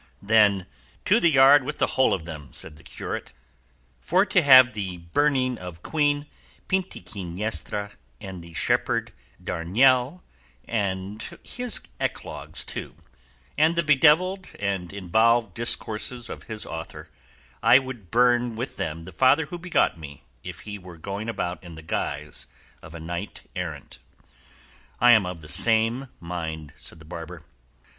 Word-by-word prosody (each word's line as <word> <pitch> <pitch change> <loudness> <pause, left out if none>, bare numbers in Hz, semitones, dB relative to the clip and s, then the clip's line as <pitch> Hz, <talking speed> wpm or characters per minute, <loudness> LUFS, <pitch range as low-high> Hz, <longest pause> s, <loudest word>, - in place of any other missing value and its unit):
"Then 100 -3 +4 0.4
to - - +5
the 170 - +4
yard 140 -1 +7
with - - -4
the - - +3
whole 130 - +3
of 80 - -1
them," 75 -5 -9
said 80 - -7
the 75 - -16
curate; - - -6 0.7
"for 185 - +2
to 190 - +3
have 130 -4 +8
the 95 -4 -4
burning 130 - +1
of 90 -2 -9
Queen 145 -2 +1 0.4
Pintiquiniestra, 105 - -3 0.3
and 95 -3 -8
the 85 0 -13
shepherd 70 - 0 0.3
Darinel 125 - +2 0.4
and 100 -1 -3
his 245 -2 -3 0.2
eclogues, - - -4 0.9
and 160 +2 +4
the 170 - +2
bedevilled 160 +6 +3
and 95 -4 -2
involved 110 +3 +2
discourses 115 +2 -1
of - - -9
his 110 -2 -4
author, 80 -1 -8 0.5
I - - +7
would 130 -8 -5
burn 120 +1 +3
with 120 +4 -5
them 80 +1 -4
the 95 - -9
father 130 - +4
who 175 +3 -7
begot 170 - +1
me 75 -3 -10 0.2
if 90 0 -8
he 105 -1 -7
were 90 -2 -12
going 100 +6 -5
about 95 -4 -3
in 85 -2 -10
the 80 - -11
guise 65 -5 -4 0.3
of 80 - -12
a - - -7
knight 85 +5 -6
errant." - - -6 1.0
"I 120 0 +7
am 110 -6 +5
of 90 -2 -6
the 75 - -12
same 115 - +3
mind," 80 -3 -5
said - - -7
the 80 - -15
barber. 80 0 -8
105 Hz, 145 wpm, -25 LUFS, 85-130 Hz, 1.0 s, have